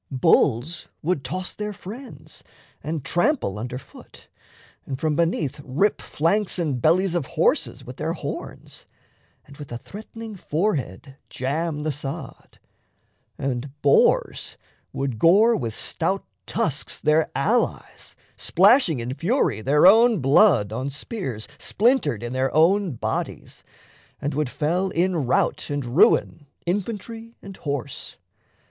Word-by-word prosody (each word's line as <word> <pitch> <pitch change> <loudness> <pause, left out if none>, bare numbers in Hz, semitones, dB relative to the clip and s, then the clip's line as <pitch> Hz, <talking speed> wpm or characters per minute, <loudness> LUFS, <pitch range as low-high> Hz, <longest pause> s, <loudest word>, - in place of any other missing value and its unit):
Bulls 135 +1 +2 0.2
would 160 -4 0
toss 185 +6 -4
their 210 0 -4
friends, 225 +8 -9 0.4
And 155 -2 -4
trample 175 - +1
under 125 +3 -4
foot, 130 - -15 0.5
and 135 -2 -5
from 155 -1 0
beneath 165 -4 0
Rip 160 +11 +1
flanks 185 +7 0
and 150 -8 -1
bellies 180 +5 +3
of 170 -6 -1
horses - - 0
with - - -9
their - - -2
horns, - - -7 0.6
And 140 0 -15
with 145 -4 -10
a 120 - -3
threat'ning 220 - -9
forehead 145 - -2
jam 150 +4 -2
the 155 +1 -1
sod; 140 -1 -7 0.8
And 135 +2 -4
boars 140 - +3 0.3
would 135 -5 -3
gore 210 - +6
with 115 - -3
stout 190 +4 -1 0.2
tusks 160 - -1
their 155 +1 +2
allies, - - -1 0.2
Splashing 195 - +4
in 120 +2 -4
fury 165 - 0
their 145 +7 +4
own 225 +2 +7
blood 135 - +4
on 130 +4 -2
spears 140 - -5
Splintered 225 - +1
in 120 +1 -4
their 130 +1 0
own 180 +2 +4
bodies, 115 - -4 0.6
and 145 - -2
would 150 -1 -1
fell 175 +8 0
In 175 -5 0
rout - - +1
and 145 -2 -2
ruin 135 +4 +3 0.2
infantry 225 +5 -4
and 195 - -9
horse. 140 -4 -5
155 Hz, 130 wpm, -23 LUFS, 135-195 Hz, 0.8 s, own